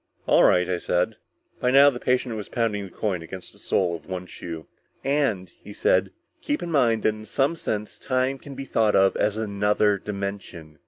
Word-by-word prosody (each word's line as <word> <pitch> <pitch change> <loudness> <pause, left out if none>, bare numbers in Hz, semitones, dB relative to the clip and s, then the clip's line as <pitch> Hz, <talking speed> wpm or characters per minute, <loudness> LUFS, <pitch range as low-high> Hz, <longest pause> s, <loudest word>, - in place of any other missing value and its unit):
"All - - +5
right," 90 -1 +4
I 90 -1 -1
said. 90 +6 0 0.4
By 125 - +1
now 140 +2 +7
the 120 - -6
patient 125 -2 0
was 105 -2 -6
pounding 110 -4 -1
the - - -10
coin 95 -6 -2
against 90 +3 -9
the - - -19
sole 90 -3 0
of 80 -2 -11
one 90 -1 -5
shoe. 85 -3 -8 0.4
"And," 135 -10 0
he 105 - -10
said, 95 -1 +2 0.3
"keep 295 0 -2
in 170 - -4
mind 120 -7 +2
that - - +4
in 110 0 -6
some 140 +9 +1
sense 105 -9 -4
time 130 +1 0
can 140 0 -10
be 135 +1 -6
thought 110 -4 +2
of 95 0 +4
as 105 0 +1
another 105 -1 +1
dimension." 100 -6 -6
105 Hz, 200 wpm, -25 LUFS, 95-125 Hz, 0.4 s, now